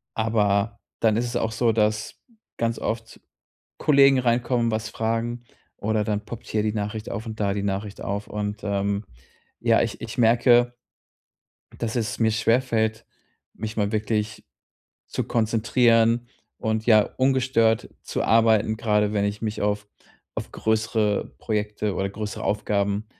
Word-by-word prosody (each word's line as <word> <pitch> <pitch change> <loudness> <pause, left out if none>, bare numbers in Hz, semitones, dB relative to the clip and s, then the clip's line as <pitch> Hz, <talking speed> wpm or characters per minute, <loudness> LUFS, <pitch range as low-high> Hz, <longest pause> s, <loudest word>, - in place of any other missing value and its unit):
Aber, 110 -1 +1 0.2
dann 110 -2 +4
ist 120 - +1
es 120 0 -2
auch 110 -1 -1
so, 115 0 +2
dass 105 0 0 0.4
ganz 115 0 -1
oft 115 0 -4 0.6
Kollegen 140 -2 +5
reinkommen, 120 -1 +1
was 110 0 -2
fragen 115 +2 -2 0.3
oder 110 0 0
dann 105 0 -2
poppt 120 -1 -8
hier 105 -1 0
die 105 -1 0
Nachricht 105 0 -4
auf 110 +4 -4
und 110 -1 -7
da 100 -2 +1
die 100 0 -2
Nachricht 100 +1 -3
auf. 100 +1 -3
Und, 105 0 -4
ähm, 100 0 -1 0.6
ja, - - +4
ich - - -3
ich - - -6
merke, 120 +1 +4 1.0
dass 115 0 -2
es 115 -2 -2
mir 110 -1 +4
schwerfällt, 110 -1 +1 0.5
mich 110 +1 -6
mal 100 -1 +1
wirklich 110 0 -1 0.6
zu - - -2
konzentrieren 115 +1 +2 0.3
und, 110 0 -1
ja, 110 -3 +7 0.2
ungestört 130 -4 +2
zu - - -3
arbeiten, 110 -1 +4
grade 105 -2 +1
wenn 100 -1 +1
ich 100 +1 -3
mich 110 -1 -2
auf 105 0 0 0.5
auf - - -4
größere 110 -1 0
Projekte 105 -1 -2
oder 95 +2 -1
größere 105 0 -5
Aufgaben, 100 0 0
110 Hz, 145 wpm, -24 LUFS, 105-115 Hz, 1.0 s, ja